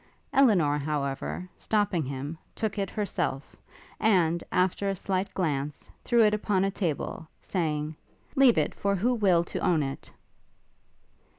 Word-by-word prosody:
Elinor, 180 - +4
however, 145 +4 -3
stopping 205 -6 +1
him, 140 +3 -5 0.2
took 215 -2 -2
it 195 -1 -1
herself, 185 -9 -3 0.4
and, 175 -6 +3
after 185 +2 +1
a 195 - -1
slight 190 +1 -2
glance, 150 -5 -2
threw 235 -2 +4
it 210 -1 +4
upon 205 -2 +1
a 195 - 0
table, 165 -3 -3
saying, 155 -4 -2 0.4
'Leave 270 -4 +6
it - - +1
for 200 -1 0
who 235 +7 +1
will 190 -7 +3
to - - -5
own 165 -4 +2
it.' 135 0 -6
180 Hz, 135 wpm, -28 LUFS, 150-205 Hz, 0.4 s, Leave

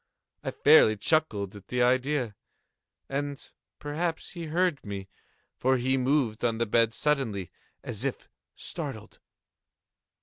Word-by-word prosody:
I - - -2
fairly 145 -8 +6
chuckled 105 - +1
at 100 -2 -12
the 125 0 +1
idea; 130 -2 +1 0.7
and 140 0 -4 0.3
perhaps 160 +3 -3
he 170 -2 -6
heard 170 -1 +1
me; 100 -2 -6 0.5
for 130 +1 +2
he 130 +2 +1
moved 130 -4 +1
on 115 -2 +1
the 115 - +1
bed 115 +1 +2
suddenly, 120 - 0 0.3
as 110 +2 -4
if 135 -2 -3 0.3
startled. - - -6
130 Hz, 125 wpm, -28 LUFS, 110-150 Hz, 0.7 s, fairly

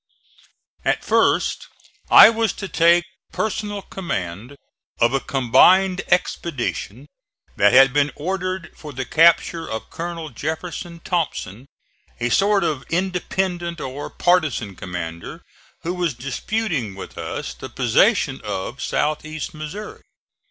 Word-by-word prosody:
At - - 0
first - - +2 0.4
I - - +10
was 225 -2 0
to 195 - -6
take 170 0 +4 0.3
personal 205 -1 -3
command 115 - -5 0.4
of 120 +2 +3
a 135 - +2
combined 180 +10 +4
expedition 140 - -1 0.5
that 105 0 +4
had 135 0 +6
been 145 0 +2
ordered 185 +2 -3
for 150 - -9
the 130 0 -4
capture 165 +2 +3
of 110 - -6
Colonel 170 -2 -5
Jeff. 160 +2 -4 0.4
Thompson, 140 - -3 0.5
a 120 - 0
sort 200 - +3
of 150 -6 -1
independent 180 -1 -2
or 135 +2 -5
partisan 155 - +1
commander 85 -3 -7 0.4
who 175 - -2
was 175 -6 -1
disputing 135 - -3
with 95 - -9
us - - -5
the - - -9
possession - - +2
of - - -5
south 150 0 -1
east 155 +2 -6
Missouri. 155 +8 -7
160 Hz, 120 wpm, -21 LUFS, 130-180 Hz, 0.5 s, I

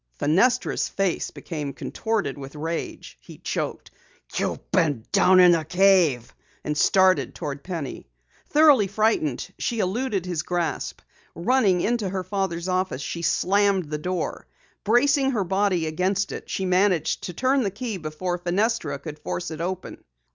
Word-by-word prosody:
Fenestra's 245 - +2
face 195 -3 -1
became 150 -5 -6
contorted 225 -2 -2
with 140 +1 -9
rage. 165 +3 -5
He - - -13
choked, - - -4 0.4
"You've - - -3
been 145 - +1
down 185 -2 +5
in 180 -1 +8
the 165 -2 +2
cave!" 170 -8 +3 0.3
and 150 - -2
started 185 +4 +3
toward 145 -4 -5
Penny. 165 -7 -6 0.4
Thoroughly 295 -9 +5
frightened, 200 - 0
she 235 - -1
eluded 205 -1 -1
his 175 -4 -2
grasp. 175 -1 -3 0.3
Running 200 -3 +2
into 225 -2 0
her 190 0 -3
father's 190 -3 -2
office, 185 -7 -1
she 170 - -4
slammed 190 0 +2
the 150 - -2
door. 180 +3 -3 0.4
Bracing 270 +5 +3
her 210 -4 +1
body 190 -2 +1
against 185 +5 0
it, - - -7
she 190 - -2
managed 185 -3 +2
to 180 - -5
turn 260 +8 +2
the 205 - 0
key 215 +1 -5
before 175 +2 -4
Fenestra 180 -4 0
could 150 +2 -9
force 90 - -4
it 160 0 -6
open. 185 +1 -5
185 Hz, 145 wpm, -24 LUFS, 160-205 Hz, 0.4 s, in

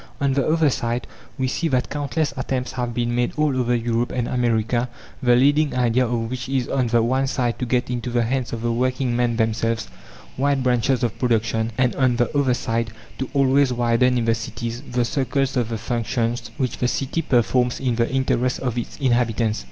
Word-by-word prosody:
On 140 -2 +1
the 140 0 +1
other 155 -2 +3
side, 120 0 -2 0.3
we 130 -1 0
see 165 +6 -1
that 130 -5 0
countless 145 +1 -1
attempts 130 0 -2
have 125 -1 -3
been 120 0 -1
made 120 0 0
all 150 -3 +2
over 125 -1 +1
Europe 120 0 0
and 120 -2 -1
America, 120 0 0 0.3
the 125 -1 +4
leading 145 +3 +3
idea 125 0 +2
of 115 -1 -1
which 130 0 -4
is, 130 -3 0
on 130 -3 0
the 115 0 +3
one 130 +3 +1
side, 125 -3 -1
to 125 - -2
get 125 +1 +1
into 125 0 -3
the 120 -1 +1
hands 125 +1 -1
of 115 -1 -4
the 120 - +1
working 125 +1 0
men 120 -1 +1
themselves 115 0 0 0.5
wide 140 0 +1
branches 125 0 +1
of 115 -4 -1
production, 115 -2 +1
and, 125 -1 +2
on 130 -3 +3
the 120 +5 0
other 135 -3 +3
side, 115 -2 -2 0.3
to 130 - -3
always 135 0 +4
widen 125 +1 +2
in 120 - 0
the 115 - +3
cities 115 +2 -5
the 125 -1 +1
circles 135 +1 0
of 120 -3 0
the 115 - -2
functions 115 0 -2
which 130 -2 -2
the 125 - +2
city 135 +5 -1
performs 125 -2 +1
in 130 -3 0
the 115 0 +1
interest 130 -1 +1
of 125 -2 -1
its 120 - -6
inhabitants. 120 -4 +1
125 Hz, 205 wpm, -22 LUFS, 115-130 Hz, 0.5 s, the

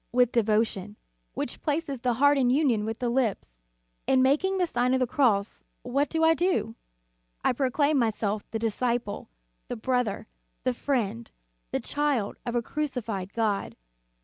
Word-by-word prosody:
With 245 0 +3
devotion; 210 -3 +1 0.4
which - - -4
places 290 -4 -2
the 245 -2 +1
heart 285 +4 +5
in 260 -3 +3
union 250 -6 +2
with 225 0 -3
the 245 - -2
lips. 225 - -1 0.5
In 260 -1 +4
making 335 +9 +2
the 365 - +2
Sign 250 -5 +1
of - - +1
the 255 - +3
Cross 230 -7 +1 0.2
what 275 +4 0
do 320 0 0
I 325 0 +6
do? 345 - 0 0.7
I - - +3
proclaim 285 +3 +2
myself 215 -3 0
the 225 - -2
disciple, 230 - -2 0.4
the - - -4
brother, 245 -2 -1 0.4
the - - +1
friend, 205 - -2 0.4
the - - -1
child 290 -8 -1
of 240 - -2
a 240 - +1
crucified 230 -10 -3
God. 215 -3 -1
245 Hz, 155 wpm, -27 LUFS, 220-280 Hz, 0.7 s, I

